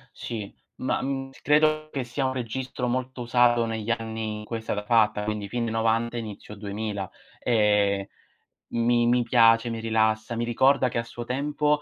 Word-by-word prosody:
Sì, 105 -4 -6 0.2
ma, 130 - -1
mhmm, 135 0 -3
credo 155 +1 +3
che 135 -2 -2
sia 130 +3 -2
un 130 - 0
registro 125 +1 -3
molto 130 +1 -2
usato 120 0 +3
negli 110 -1 -4
anni 110 -2 -2
in - - -8
cui 115 - -4
è - - -5
stata 105 -2 -3
fatta, 105 -2 +3
quindi 105 -1 -3
fine 115 -1 -2
'90, 115 +1 +1
inizio 105 -2 -7
2000. 100 -1 -4 0.3
E 105 -4 +2 0.6
mi 120 0 +2
mi 120 0 +3
piace, 115 0 +5
mi 115 -1 -4
rilassa, 110 +1 +1
mi 120 - 0
ricorda 130 +3 +3
che 120 -1 -2
a - - -1
suo 120 +1 -8
tempo 150 +3 0
115 Hz, 175 wpm, -26 LUFS, 110-125 Hz, 0.6 s, piace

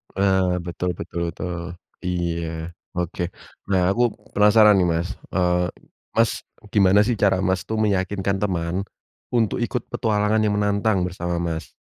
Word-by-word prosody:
Ah, 95 -2 +2
betul 90 +1 -3
betul, 85 0 -4
tuh. 90 - -4 0.6
Iya, 85 -2 -1 0.5
oke. 90 0 -3 0.5
Nah, 95 -1 +3
aku 120 +5 0 0.3
penasaran, 105 0 +6
nih, 90 - +3
Mas, 85 +2 -1 0.3
eee, 90 -1 +2 0.5
Mas, - - +4 0.4
gimana, 100 -1 +5
sih, 120 - +1
cara, 95 -1 +5
Mas, 95 -1 +1
tuh 110 - -2
meyakinkan 100 -1 0
teman 85 -4 -1 0.6
untuk 115 -4 +2
ikut 125 - -2
petualangan 110 -3 +1
yang 105 - +1
menantang 105 0 +1
bersama, 90 -1 -3
Mas? 80 0 -4
95 Hz, 135 wpm, -23 LUFS, 90-105 Hz, 0.6 s, penasaran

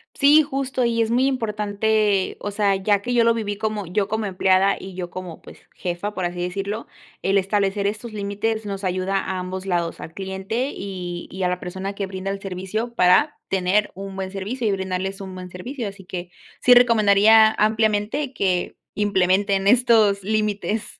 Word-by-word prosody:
Sí, 295 +2 +6
justo 270 -3 -2
y 230 -1 +1
es 225 - +1
muy 250 +3 +2
importante, 215 -4 0
o 205 - -4
sea, 200 -1 +2
ya 200 +1 +1
que 245 +4 -2
yo 235 - +5
lo 230 0 +4
viví 205 -3 -3
como, 215 -3 -3
yo 195 +3 0
como 220 0 -2
empleada, 190 +1 +3
y 190 0 -9
yo 180 -1 -5
como, 180 -2 -8
pues, - - -14 0.2
jefa, 180 +4 -4
por 185 - -4
así 175 0 -4
decirlo, 195 +5 -3 0.4
el 195 +1 +3
establecer 200 +1 0
estos 215 +2 -5
límites, 210 +2 -2
nos 195 0 -5
ayuda 185 +1 0
a 190 -1 -2
ambos 185 +1 -5
lados 175 -3 -1
al 160 - -9
cliente 195 - -3
y 180 -3 -6
y 190 - -6
a - - +3
la 180 0 -2
persona 190 +2 -5
que 200 - -2
brinda 190 0 -5
el 195 - -3
servicio, 195 +5 -4
para 185 +11 +3
tener 195 +2 +1
un 195 0 -7
buen 190 -1 -4
servicio 215 +5 -3
y - - +2
brindarles 190 0 -3
un 190 -1 -7
buen 185 -1 -8
servicio. 230 +6 -6
Así 195 -1 -10
que 180 -1 -6 0.3
sí 250 - +7
recomendaría 220 -2 +6
ampliamente 220 +5 +1
que 185 -5 -1 0.2
implementen 195 -1 +1
estos 220 -4 +4
límites. 215 0 -2
200 Hz, 185 wpm, -22 LUFS, 190-220 Hz, 0.4 s, sí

